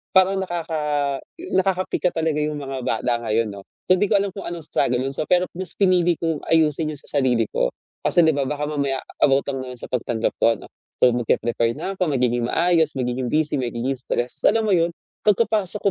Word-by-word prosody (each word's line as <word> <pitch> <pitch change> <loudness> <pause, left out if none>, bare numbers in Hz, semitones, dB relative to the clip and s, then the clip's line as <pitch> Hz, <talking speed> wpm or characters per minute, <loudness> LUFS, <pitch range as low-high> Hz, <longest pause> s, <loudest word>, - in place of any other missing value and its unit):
Parang 190 +1 +5
nakaka 170 -3 -3 0.6
'yo 370 - -5
nakapika 185 -1 +1
talaga 160 -2 0
'yong 150 0 -1
mga 135 -2 -5
bata 120 +1 0
ngayon, 110 0 +1
'no. 100 -1 -9 0.2
Hindi 185 +3 +3
ko 200 - +5
alam 200 - 0
kung 195 - -6
anong 170 -2 -6
struggle 125 0 +1
'yon 135 +1 -2
sa 155 - -1
pero, 180 0 +3
mas 185 -2 -3
pinili 180 -3 +3
kong 165 -3 -2
ayusin 155 -1 +2
'yon 145 - -7
sa 145 - -2
sarili 120 -4 +2
ko, - - +1 0.3
kasi, - - +2
'di 160 -2 +3
ba, 140 - +1
baka 150 +1 -2
mamaya 140 -3 -1 0.2
about 135 0 +3
lang 130 -1 -4
naman 125 -1 -8
sa - - -7
pagtanggap 120 -2 -1
ko, 115 0 +5
ano. - - -12 0.4
So, 125 -1 +6
mag-pre-prepare 115 0 +1
na 195 0 -4
ako, 180 -5 0
magiging 120 -2 +1
maayos, 165 -2 +3
magiging 125 0 -2
busy, 155 -1 +1
magiging 125 +2 -2
stress, 125 -1 -2
alam 225 -1 +2
mo 195 - +4
'yon, 170 0 +2 0.3
pagkapasok 210 -2 +2
150 Hz, 200 wpm, -22 LUFS, 125-180 Hz, 0.6 s, So